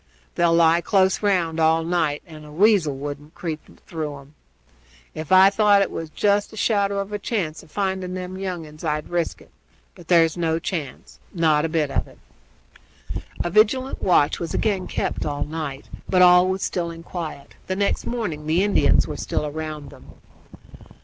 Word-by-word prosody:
They'll 170 -1 +3
lie 165 0 +4
close 190 0 +2
round 175 -6 +1
all 160 0 +3
night, 160 -3 0
and 155 -3 -12
a 150 - -12
weasel 175 -5 +3
wouldn't 145 +2 -7
creep 160 -3 -4 0.2
through 155 -4 -5
'em. 140 +1 -16 0.8
Ef 155 +3 -6
I 190 +1 +7
thought 205 -1 +4
there 195 - +1
was 165 -1 -6
jest 205 +5 +1
a 220 - -12
shadow 200 -2 +1
of 200 +1 -3
chance 175 -9 -2
of - - -19
finding 190 0 -2
them 185 0 -6
young 185 -4 -4
uns 155 +1 -13
I'd 150 -1 -2
risk 175 -1 -2
it; - - -24 0.4
but 175 -3 -15
there's 165 -2 +4
no 165 -2 0
chance 165 -4 -6 0.2
not 160 -2 +3
a - - -1
bit 155 -3 0
of - - -1
it." - - -17 1.3
A 175 - -3
vigilant 255 +7 +2
watch 150 -5 +3
was 170 - -4
again 195 -4 0
kept - - -2
up 150 - -2
all 145 - -2
night, 150 -3 -6 0.2
but 180 -1 +5
all 180 0 +7
was 190 +1 -2
still 175 -2 -2
and 165 0 -10
quiet. 155 -5 -7
The 185 - -1
next 200 +1 -1
morning 180 -11 -3
the 165 +4 +2
Indians 205 0 +3
were - - -5
still 150 - -2
round 155 -1 -6
them. - - -15
170 Hz, 185 wpm, -23 LUFS, 155-190 Hz, 1.3 s, I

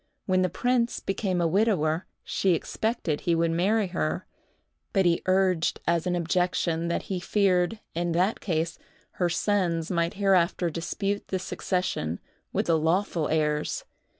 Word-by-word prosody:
When 185 -1 +2
the 185 - +2
prince 245 +5 0
became 195 -2 -1
a 170 - +2
widower, 175 -4 +1 0.2
she 185 -3 +1
expected 205 -5 -2
he 170 - +1
would 165 0 +2
marry 200 +6 +2
her; 80 - -2 0.7
but 190 -1 +3
he 170 -1 +3
urged 185 -3 +2
as 170 +1 +1
an 180 - +1
objection 170 -1 0
that 170 - -1
he 190 -2 -3
feared, 190 +2 +1
in 170 +1 -1
that 185 +6 +1
case, 165 -3 -2 0.4
her 175 -1 +2
sons 170 -3 0
might 170 -1 0
hereafter 185 -3 +2
dispute 195 +5 -2
the 190 - -1
succession 180 - -2 0.3
with - - 0
the 165 -2 +3
lawful 165 0 +1
heirs. 150 -1 0
175 Hz, 150 wpm, -27 LUFS, 165-195 Hz, 0.7 s, but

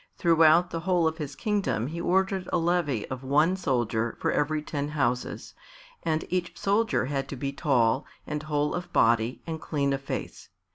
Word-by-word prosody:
Throughout 165 +1 +5
the 165 - -2
whole 175 0 +1
of 160 +1 -3
his 145 -2 -5
kingdom 205 - -1
he 165 +5 -4
ordered 190 +1 +1
a - - +2
levy 165 -9 0
of 130 0 -5
one 150 +7 +3
soldier 120 - -1
for - - 0
every 150 +1 0
ten 145 -2 -3
houses, 125 -5 -2 0.5
and 160 -1 -1
each 180 -1 -2
soldier 210 - +1
had 135 0 -3
to - - -4
be 140 +2 -3
tall 130 -3 +2 0.2
and 150 0 -3
whole 150 -1 -1
of 175 0 -5
body 115 +1 +2
and 160 -1 -5
clean 140 -3 0
of 135 - -2
face. 135 - -6
150 Hz, 180 wpm, -27 LUFS, 135-175 Hz, 0.5 s, Throughout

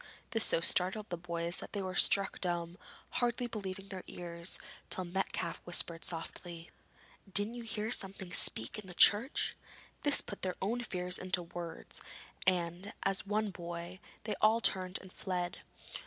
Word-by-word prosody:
This 225 -2 +3
so 165 - +4
startled 190 +5 +1
the 175 - -1
boys 170 0 -1
that - - -7
they 205 - -1
were 185 0 -3
struck 195 -1 +5
dumb, 175 0 -2 0.3
hardly 245 0 +1
believing 195 -4 -5
their 190 -2 -6
ears, 170 0 -4 0.3
till 185 - +3
Metcalfe 175 -2 -2
whispered 170 -1 -1
softly: 170 0 -5 0.6
'Didn't 205 +4 +5
you 240 - -6
hear 220 -1 -2
something 190 -4 +1
speak 115 - +1
in 205 - -10
the 180 - -7
church?' 225 - +5 0.5
This 290 -1 +7
put 200 - -8
their 185 -1 -1
own 230 +5 0
fears 180 -5 0
into 185 -1 -1
words, 170 0 -6 0.5
and, 180 +2 +1
as 195 +1 +2
one 210 0 +1
boy, 175 0 -6 0.2
they 210 -1 -2
all 220 +2 +6
turned 185 -4 +1
and 190 - -13
fled. 180 -2 -3
185 Hz, 155 wpm, -34 LUFS, 175-205 Hz, 0.6 s, This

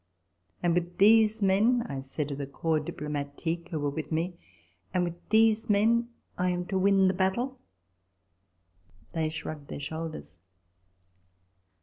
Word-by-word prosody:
" 90 - -37
And 175 -1 +3
with 175 0 -1
these 220 +1 +5
men," 220 +6 +3
I 140 -1 -4
said 135 +2 -4
to 140 - -3
the 140 0 -5
Corps 160 +3 0
Diplomatique 150 +3 -4
who 160 - -3
were 145 -1 -1
with 155 +3 -5
me, 165 +3 0 0.3
" 90 +1 -38
And 180 - +3
with 175 0 -6
these 220 +1 +4
men 230 +3 +3 0.3
I 180 0 +2
am 180 0 -1
to 190 -2 +1
win 195 0 +4
the 185 - +2
battle." 235 +8 -1 1.5
They 160 -1 -1
shrugged 155 -2 -6
their - - -6
shoulders. 160 - -6
175 Hz, 150 wpm, -28 LUFS, 150-200 Hz, 1.5 s, these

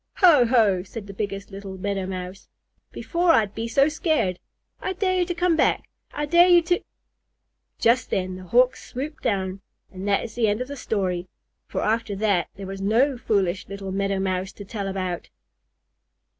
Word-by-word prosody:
"Ho 320 - +6
ho!" 220 -7 +3
said 200 +3 -8
the 200 - -9
biggest 200 0 -4
little 195 -1 -7
Meadow 195 0 -2
Mouse. 185 0 -6 0.4
"Before 345 0 +1
I'd 210 -2 +2
be 225 +1 -3
so 275 +5 +4
scared! 300 - 0 0.4
I 375 - -3
dare 370 -1 0
you 355 - +2
to 350 0 -3
come 355 -1 +2
back! - - +1 0.2
I 295 - -2
dare 345 +4 +6
you 350 -1 +6
to 355 +1 +1 0.5
" - - -53
Just 240 +2 +3
then 185 -1 -1
the 185 0 -9
Hawk 250 +6 +4
swooped 290 +5 -7
down. 190 -1 -1 0.3
And 190 +1 -6
that 200 -1 +2
is 225 - -7
the 230 -1 +1
end 205 +1 +1
of 250 +2 -4
the 285 - -5
story, 185 -8 -2 0.4
for - - -3
after 220 -1 0
that, 195 -4 +1
there 195 - -8
was 195 0 -6
no 240 +8 +3
foolish 200 -6 0
little 195 -1 -6
Meadow 195 0 0
Mouse 190 0 -1
to 205 - -10
tell 200 -1 -4
about. 185 -2 -3
205 Hz, 185 wpm, -24 LUFS, 190-265 Hz, 0.5 s, Ho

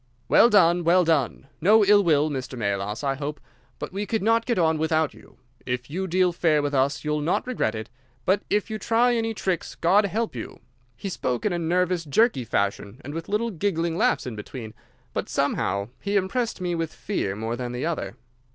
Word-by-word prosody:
"'Well 235 - +6
done, 175 -5 +4
well 175 +2 +4
done! 155 -7 0 0.2
No 210 +5 +6
ill 205 0 +6
will, 155 -3 +3
Mr. 130 -2 -5
Melas, 100 +1 -2
I 135 -1 +1
hope, 145 +2 -5 0.4
but - - -6
we 200 +1 -3
could 220 -3 -1
not 230 +1 +2
get 235 - +1
on 160 -3 +2
without 160 -1 +1
you. - - -18 0.3
If 125 +2 -4
you 190 +4 -2
deal 180 0 +2
fair 155 -4 +2
with 145 0 -2
us 140 +1 +1
you'll 150 0 -1
not 160 +5 0
regret 250 - -1
it, 110 0 -5 0.4
but 190 +2 +2
if 210 +2 0
you 215 - -3
try 235 +3 +3
any 225 -1 -1
tricks, 185 -5 -2
God 195 +5 +3
help 220 - -2
you!' 115 - -7 0.4
He 195 - -5
spoke 125 - -2
in 205 - +1
a 175 - -1
nervous, 175 +1 +1
jerky 155 - +2
fashion, 100 +1 -2
and 145 - -6
with 165 0 -6
little 220 +3 0
giggling 170 -3 -1
laughs - - +1
in 125 -3 -5
between, 110 +1 -8 0.4
but - - -3
somehow 100 +2 0
he 200 +1 -2
impressed 205 +5 0
me 175 -1 -1
with 165 -2 -2
fear 100 - -3
more 110 +2 -3
than 120 0 -4
the 125 +4 -3
other. 115 - -3
165 Hz, 205 wpm, -25 LUFS, 130-200 Hz, 0.4 s, Well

